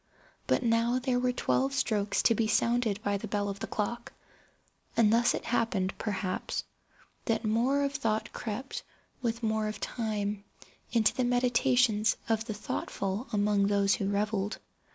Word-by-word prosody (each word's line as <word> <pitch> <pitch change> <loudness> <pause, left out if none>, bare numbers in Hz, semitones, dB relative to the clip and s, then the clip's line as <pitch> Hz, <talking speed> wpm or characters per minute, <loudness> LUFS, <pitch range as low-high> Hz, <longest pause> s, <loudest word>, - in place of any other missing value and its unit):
But - - +2
now 230 +1 +2
there 255 -1 0
were 250 0 +2
twelve 130 - 0
strokes 200 +9 +1
to 230 - +5
be 225 0 +1
sounded 230 -1 +2
by 205 0 +1
the 220 - -5
bell 205 0 -1
of 200 0 -5
the - - -4
clock; 235 +3 -3 0.8
and 220 -2 +5
thus 240 +1 +4
it - - -5
happened, 220 -5 0
perhaps, 190 -3 -2 0.6
that 225 -1 0
more 245 +6 +2
of 280 0 -1
thought 220 -6 -1
crept, 240 +4 -4 0.4
with 235 -1 -2
more 220 -1 +1
of 215 0 -5
time, 210 -3 -2 0.5
into 225 -3 +3
the 255 - 0
meditations 245 -2 +3
of 225 -1 0
the 220 - -3
thoughtful 200 +2 -3
among 205 -1 +2
those 200 -1 +3
who 195 - -1
revelled. 205 0 -1
220 Hz, 155 wpm, -30 LUFS, 205-240 Hz, 0.8 s, to